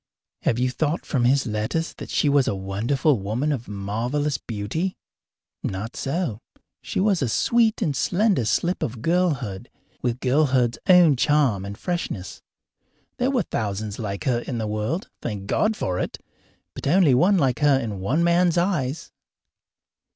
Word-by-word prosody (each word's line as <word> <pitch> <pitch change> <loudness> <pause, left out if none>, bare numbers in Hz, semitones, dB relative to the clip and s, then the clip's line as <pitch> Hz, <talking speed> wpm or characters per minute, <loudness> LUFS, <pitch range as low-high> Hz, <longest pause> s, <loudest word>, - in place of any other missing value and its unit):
Have 115 - +1
you 125 +1 +1
thought 155 +4 -1
from 125 -4 0
his 135 +2 +3
letters 110 +9 -2
that - - -7
she - - +1
was 140 -2 +3
a - - 0
wonderful 115 +9 0
woman 115 +10 -1
of 125 -5 -3
marvellous 120 +8 -2
beauty? 120 - -3 0.6
Not 100 +5 -4
so. 135 - -2 0.4
She - - -3
was 195 -3 +2
a 130 - 0
sweet 225 - +2
and 150 -7 0
slender 185 - +1
slip 175 - 0
of 115 -1 -4
girlhood, 140 - 0 0.3
with 120 0 -1
girlhood's 130 -3 +2
own 175 -6 +7
charm 130 -9 +2
and 100 +1 -7
freshness. 140 - -4 0.8
There 250 +2 +1
were 255 -6 +1
thousands 105 - -3
like 100 -3 -4
her 125 -3 +1
in 120 0 -5
the 110 - -2
world 110 - -2
thank 105 -4 -4
God 215 - +1
for 90 -1 -2
it! - - -3 0.6
but - - -5
only 165 -2 +5
one 185 +10 +4
like 130 -7 +1
her 145 -2 +4
in 110 -6 -4
one 130 - +1
man's 170 0 +3
eyes. 170 -6 -1
130 Hz, 160 wpm, -24 LUFS, 110-165 Hz, 0.8 s, own